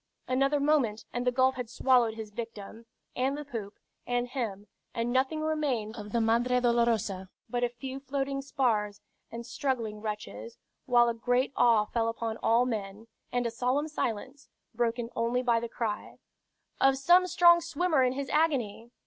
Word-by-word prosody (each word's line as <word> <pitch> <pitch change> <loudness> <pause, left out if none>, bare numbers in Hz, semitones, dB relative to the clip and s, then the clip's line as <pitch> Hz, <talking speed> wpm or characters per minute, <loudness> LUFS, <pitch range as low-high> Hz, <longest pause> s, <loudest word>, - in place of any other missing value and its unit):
Another 275 +3 +2
moment 280 -7 +1
and 245 +1 -2
the - - +4
gulf 260 +1 +3
had 250 -3 -6
swallowed 240 -2 +3
his 220 -2 -7
victim, 225 0 -8 0.3
and 265 +3 0
the 295 - -6
poop, 220 -7 -6 0.3
and 245 0 0
him; 220 -6 -4 0.3
and 235 +1 -1
nothing 265 +4 +1
remained 285 -9 -1
of 210 -2 -8
the 235 - +1
Madre 235 +3 +2
Dolorosa 230 -6 +1 0.2
but 245 0 -2
a 245 - +2
few 260 +2 -7
floating 275 0 -2
spars 230 -7 0 0.3
and 235 +1 -7
struggling 230 -5 -3
wretches, 215 +2 -6 0.3
while 240 -1 +5
a 235 - +1
great 245 +4 0
awe 230 -3 +4
fell 230 +1 -1
upon 230 -1 -3
all 235 +2 +3
men, 210 -3 -4 0.3
and 245 0 0
a 235 - -1
solemn 255 +5 0
silence, 270 -1 -4 0.2
broken 235 0 -1
only 235 +2 0
by 235 -2 +3
the 235 0 -5
cry 220 -3 -4 0.6
"Of 270 0 +4
some 350 +7 +5
strong 345 -1 +6
swimmer 340 -2 +1
in 255 0 +2
his 275 0 -4
agony." 255 -8 0
245 Hz, 165 wpm, -29 LUFS, 225-270 Hz, 0.6 s, strong